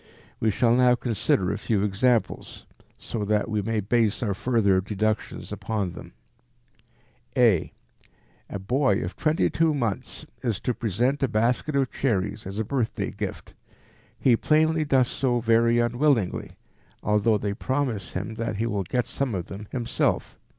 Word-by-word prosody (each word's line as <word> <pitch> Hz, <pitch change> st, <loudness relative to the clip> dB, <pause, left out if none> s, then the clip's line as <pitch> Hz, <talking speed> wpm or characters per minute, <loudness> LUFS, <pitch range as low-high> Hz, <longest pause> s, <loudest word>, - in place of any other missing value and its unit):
We 110 Hz, -, +2 dB
shall 115 Hz, +3 st, +3 dB
now 125 Hz, 0 st, +5 dB
consider 110 Hz, -6 st, 0 dB
a -, -, -3 dB
few 105 Hz, -3 st, 0 dB
examples 110 Hz, +4 st, 0 dB, 0.3 s
so 110 Hz, -, -4 dB
that 105 Hz, 0 st, +1 dB
we 105 Hz, -2 st, -1 dB
may 110 Hz, +1 st, -1 dB
base 115 Hz, +2 st, +1 dB
our 105 Hz, -4 st, 0 dB
further 105 Hz, -3 st, +2 dB
deductions 105 Hz, +2 st, -2 dB
upon 105 Hz, -5 st, -2 dB
them. -, -, -11 dB, 1.2 s
a). 115 Hz, -9 st, +4 dB, 0.8 s
A -, -, -4 dB
boy 105 Hz, +2 st, +1 dB
of 90 Hz, -, -5 dB
22 160 Hz, 0 st, +1 dB
months 115 Hz, -7 st, -3 dB, 0.2 s
is 110 Hz, -4 st, -1 dB
to 125 Hz, -, 0 dB
present 120 Hz, +6 st, 0 dB
a 135 Hz, -, +3 dB
basket 120 Hz, +6 st, 0 dB
of 135 Hz, -2 st, +1 dB
cherries 105 Hz, -4 st, -1 dB
as 95 Hz, +1 st, -6 dB
a 110 Hz, -, 0 dB
birthday 125 Hz, -2 st, -2 dB
gift. -, -, -6 dB, 0.6 s
He 125 Hz, -3 st, +4 dB
plainly 155 Hz, +4 st, +2 dB
does 130 Hz, -3 st, +3 dB
so 125 Hz, -2 st, 0 dB
very 115 Hz, +1 st, +3 dB
unwillingly, 120 Hz, -3 st, +1 dB, 0.5 s
although 105 Hz, +1 st, +3 dB
they 100 Hz, 0 st, -2 dB
promise 125 Hz, -4 st, -2 dB
him 100 Hz, +4 st, -4 dB
that 115 Hz, -2 st, -2 dB
he 110 Hz, +3 st, -1 dB
will 105 Hz, -4 st, -1 dB
get 120 Hz, +7 st, -1 dB
some 135 Hz, -6 st, -2 dB
of 90 Hz, -2 st, -4 dB
them 100 Hz, +2 st, -8 dB
himself. 120 Hz, -3 st, -1 dB
115 Hz, 150 wpm, -25 LUFS, 105-125 Hz, 1.2 s, now